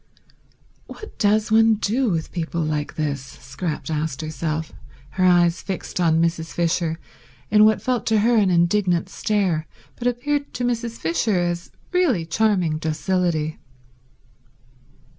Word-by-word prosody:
"What 430 - -11
does 215 +1 +2
one 225 0 +5
do 230 +4 0
with 165 -4 -2
people 170 -1 -3
like 150 -1 -2
this?" 145 -4 -2
Scrap 135 +3 -6
asked 155 -1 -2
herself, 155 0 -3 0.4
her 185 - -1
eyes 175 -1 +4
fixed 190 -1 -5
on 165 -2 +3
Mrs. 165 -1 -1
Fisher 165 -1 0 0.5
in 210 0 +7
what 215 0 +3
felt 250 -3 -1
to 220 -2 +3
her 235 +3 +3
an 205 -4 +4
indignant 175 0 +2
stare 190 -7 0 0.3
but 245 - -2
appeared 285 +4 -1
to 245 - -1
Mrs. 235 -1 -2
Fisher 175 +5 0
as 175 -1 -2 0.2
really 310 - +2
charming 180 -3 +1
docility. 160 -1 -1
175 Hz, 135 wpm, -22 LUFS, 160-215 Hz, 0.5 s, in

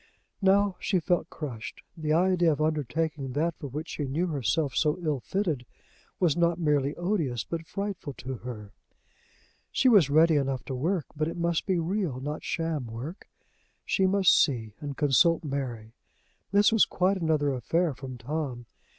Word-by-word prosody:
Now 195 0 +3
she 190 - +1
felt 170 0 0
crushed. 125 -8 -7
The 155 -2 -2
idea 175 0 +3
of 145 - -2
undertaking 155 -2 -1
that 165 +4 0
for 145 - -5
which 150 +5 -5
she 145 - -3
knew 155 +7 0
herself 145 - 0
so 155 +1 +2
ill 155 -5 -1
fitted 165 - -2 0.6
was 170 -6 +3
not 170 -1 +2
merely 150 -3 +1
odious 165 - -1
but 165 -1 -5
frightful 200 -7 -4
to 130 0 -6
her. 110 -4 -8 1.0
She - - +2
was 200 - +6
ready 160 +2 +5
enough 135 -2 -1
to 135 - -4
work, 160 +6 -1
but 155 +1 0
it 165 - -5
must 170 -1 0
be 190 -2 +2
real, 170 -5 -1
not 150 +3 -5
sham 160 -6 -2
work. 125 - -8 0.6
She 190 - +2
must 195 0 +5
see 115 -7 -2
and 145 -2 -6
consult 160 +4 +4
Mary! 125 -6 -4 0.6
This 205 +2 +5
was 225 - +6
quite 190 +2 +1
another 150 -3 +1
affair 160 +6 0
from 130 -1 -8
Tom! 130 -1 -4
155 Hz, 165 wpm, -28 LUFS, 135-175 Hz, 1.0 s, was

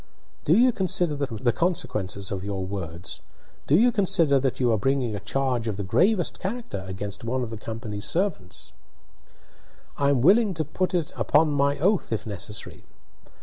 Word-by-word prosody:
"Do 165 +6 +5
you 250 +2 +6
consider 185 -6 0
the 130 -4 -1
consequences 105 - -1
of 95 -2 -3
your 100 -2 -3
words? 90 -3 -6 0.5
Do 145 - +4
you 240 +4 +5
consider 170 - +3
that 130 -1 -1
you 125 -2 +3
are 110 - +3
bringing 130 -2 0
a - - -4
charge 125 +3 -1
of 105 -3 -2
the 100 - -3
gravest 175 - +2
character 195 - -4
against 100 +2 -6
one 125 +2 -1
of 115 - -5
the 115 - -5
company's 110 -1 -5
servants?" 165 - -2 1.3
"I 140 0 +3
am 135 -4 +2
willing 200 - +5
to 160 - 0
be 150 - -16
put 185 0 0 0.2
upon 155 +1 +2
my 140 0 +2
oath, 185 - +1
if 110 - -2
necessary. 105 0 -5
130 Hz, 170 wpm, -25 LUFS, 105-175 Hz, 1.3 s, you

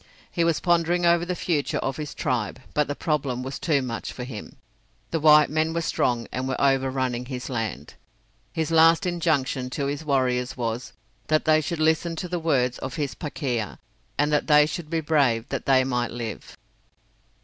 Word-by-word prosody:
He 170 - +1
was 165 -2 +2
pondering 175 0 +2
over 170 0 +4
the 180 - -1
future 160 -4 -1
of 135 - -2
his 150 -2 -6
tribe, 125 -7 -2
but 150 -1 +1
the 145 - -3
problem 140 -6 -1
was 135 +1 -5
too 145 -5 +1
much 115 -2 -4
for 125 - -7
him. 120 -4 -8 0.6
The 165 - 0
white 150 0 +7
men 160 +1 0
were 170 - +1
strong 120 -6 0
and 130 +1 -3
were 130 - -2
overrunning 130 -2 +1
his 125 0 -6
land. 110 - -4 0.6
His 160 0 -2
last 165 +3 +5
injunction 155 -7 0
to 140 +2 -3
his 145 +2 -3
warriors 130 -3 0
was, 115 0 -3 0.3
that 155 0 +2
they 155 0 +4
should 160 +2 -3
listen 160 +2 +1
to 180 - -4
the 175 0 -2
words 130 -7 +1
of 130 - -5
his 145 -4 -2
Pakeha, 130 - -3 0.4
and 150 +1 +1
that 150 - +1
they 150 -1 +6
should 155 0 -5
be 165 -1 0
brave 135 -7 +2
that - - -4
they 130 -1 +5
might 125 -2 -1
live. 115 -2 -7
145 Hz, 185 wpm, -25 LUFS, 125-160 Hz, 0.6 s, white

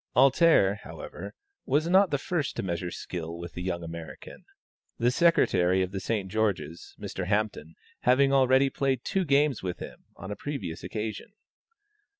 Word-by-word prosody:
"Alter," 135 - +5
however, - - -9 0.3
was 155 +3 +2
not 190 +2 +5
the 145 - +1
first 150 0 -2
to - - -3
measure 90 -1 -3
skill 85 -1 -6
with 85 0 -8
the 90 - -6
young 90 -1 -3
American, 85 0 -9 0.5
the 120 +1 +2
Secretary 95 - +3
of 90 - -4
the 95 - -3
St. 100 0 -2
George's, 100 -5 -2
Mr. 95 -2 -5
Hampton, 105 -6 -1 0.2
having 135 +2 +3
already 135 0 +4
played 135 -3 0
two 195 - 0
games 140 -3 +2
with 90 -2 -4
him, - - -10
on 95 +3 -8
a - - -3
previous 105 - -5
occasion. 110 - -5
105 Hz, 155 wpm, -28 LUFS, 90-140 Hz, 0.5 s, Alter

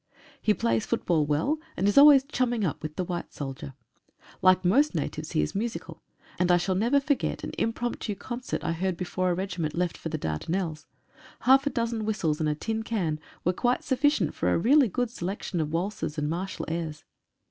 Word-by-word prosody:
He 210 - +3
plays 115 -1 +1
football 155 -4 +1
well, 210 - +1 0.2
and 195 - +1
is 205 - +2
always 280 -1 +9
chumming 245 -6 0
up 160 - -2
with 155 -1 -6
the 185 - -1
white 175 -1 -4
soldier. 135 -1 -7 0.7
Like 185 0 +5
most 280 +12 +3
natives - - -3
he - - +2
is - - -3
musical, 225 +3 -4 0.4
and 180 0 +3
I 175 - +6
shall 185 +2 0
never 235 +9 +3
forget 285 0 -1
an - - -4
impromptu 230 -2 -2
concert 245 +5 -5
I - - 0
heard 175 +1 -1
before 185 0 -1
a 175 - +1
regiment 175 -4 -3
left 175 0 0
for 165 - -6
the 155 - -2
Dardanelles. 155 - -3 0.5
Half 270 +3 +5
a - - +4
dozen 230 -3 -2
whistles 185 -8 0
and 155 -1 +1
a 150 - 0
tin 220 +8 -3
can 185 -9 -1 0.2
were 180 - +2
quite 245 +6 0
sufficient 270 - +2
for 90 - 0
a - - +3
really 265 - +5
good 245 +3 -2
selection 185 -4 -3
of 155 -1 -3
waltzes 170 -2 -2
and 150 0 0
martial 180 +5 -3
airs. 160 -2 -4
185 Hz, 195 wpm, -27 LUFS, 160-235 Hz, 0.7 s, always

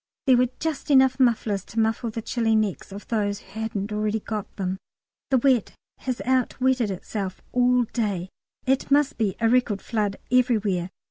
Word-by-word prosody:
There 260 -3 +6
were 250 0 +3
just 315 -1 -3
enough 265 -1 +5
mufflers 220 -6 +2
to 225 - -4
muffle 225 +2 +1
the 225 0 -5
chilly 225 -2 +1
necks 215 -3 -1
of 200 +1 -9
those 205 -3 0
who 195 +2 -11
hadn't 215 -2 -3
already 215 +1 0
got 210 -1 -5
them. 190 -1 -2 0.5
The 265 - +4
wet 255 -2 +2 0.2
has 255 -2 -3
outwetted 255 -2 +1
itself 190 0 -4
all 250 0 +3
day 205 -6 -2 0.4
it 265 0 +1
must 285 -2 +2
be 205 -4 +1
a 230 - +3
record 230 -4 +2
flood 210 -3 -2
everywhere. 215 -8 +2
225 Hz, 165 wpm, -25 LUFS, 205-250 Hz, 0.5 s, There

